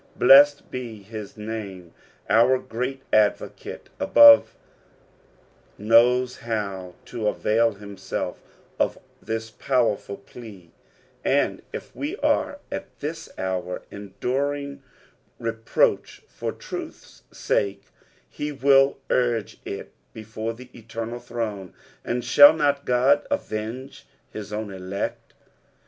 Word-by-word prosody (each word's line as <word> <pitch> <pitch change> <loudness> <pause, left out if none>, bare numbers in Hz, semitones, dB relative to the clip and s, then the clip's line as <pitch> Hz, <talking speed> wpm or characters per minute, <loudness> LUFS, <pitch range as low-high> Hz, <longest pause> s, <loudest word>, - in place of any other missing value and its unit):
Blessed 145 +3 +6
be 115 -5 -6
his 105 0 -9
name, 100 -5 -7 0.3
our 120 +4 +5
great 130 +2 -5
Advocate 105 -1 0
above 115 -1 +7 1.2
knows 125 +4 +4
how 100 -5 -4
to 115 -3 -4
avail 115 +2 +2
himself 100 -1 -6 0.4
of - - +1 0.2
this 110 +1 -4
powerful 115 -6 0
plea, 100 -5 -13 0.5
and - - +1
if - - -8
we - - -3
are - - +1
at - - -7
this - - -5
hour 90 -1 -3
enduring 140 +8 -3 0.6
reproach 115 0 0
for - - -5
truth's - - -9
sake, 100 -1 -1 0.5
be 150 0 -3
will 135 0 +4
o^fc 120 -4 0
It - - -7 0.2
before 110 +1 -5
the 125 +1 -13
eternal 115 +1 -6
throne; 105 -7 -5 0.3
and 120 0 -2
shall 145 +5 +9
not 145 -2 0
God 130 +4 +3
avenge 115 +6 -5 0.2
his 105 -1 -8
own 105 -1 -4
elect 95 +1 -5
115 Hz, 105 wpm, -24 LUFS, 105-125 Hz, 1.2 s, shall